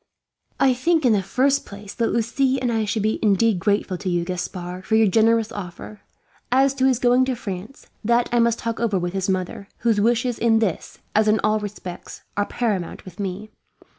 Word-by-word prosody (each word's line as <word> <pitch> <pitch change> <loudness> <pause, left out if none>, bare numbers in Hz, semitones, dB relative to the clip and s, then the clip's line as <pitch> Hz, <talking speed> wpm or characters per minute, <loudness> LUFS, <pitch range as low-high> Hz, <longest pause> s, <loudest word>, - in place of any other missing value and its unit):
"I 265 -1 +4
think, 320 +4 +1
in 240 - +5
the 200 - +2
first 265 +9 +1
place, 200 0 -10
that 230 - 0
Lucie 260 +3 +1
and 250 -2 -1
I 220 -1 0
should 210 0 -1
be 215 +1 0
indeed 210 -1 +3
grateful 200 -1 0
to 190 - -3
you, 175 -1 0
Gaspard, 180 0 -5
for 220 - 0
your 220 0 +5
generous 225 +2 +3
offer. 205 0 -8 0.5
As 265 +2 +4
to 265 -1 +2
his 260 -2 +3
going 245 +1 +3
to 260 -1 -1
France, 205 +2 -7 0.2
that 235 +2 +2
I 240 - +2
must 235 0 +3
talk 230 -1 -4
over 225 -4 +1
with 175 0 -2
his 190 0 -2
mother; 185 +1 -2
whose 225 -4 +2
wishes 240 +2 +1
in 225 -1 +3
this, 215 -7 -2 0.2
as 215 0 +3
in 215 0 +3
all 215 0 +2
respects, 200 -4 -8
are 205 0 0
paramount 205 -8 -2
with 185 0 -12
me. 200 +2 -5
215 Hz, 200 wpm, -22 LUFS, 195-240 Hz, 0.5 s, in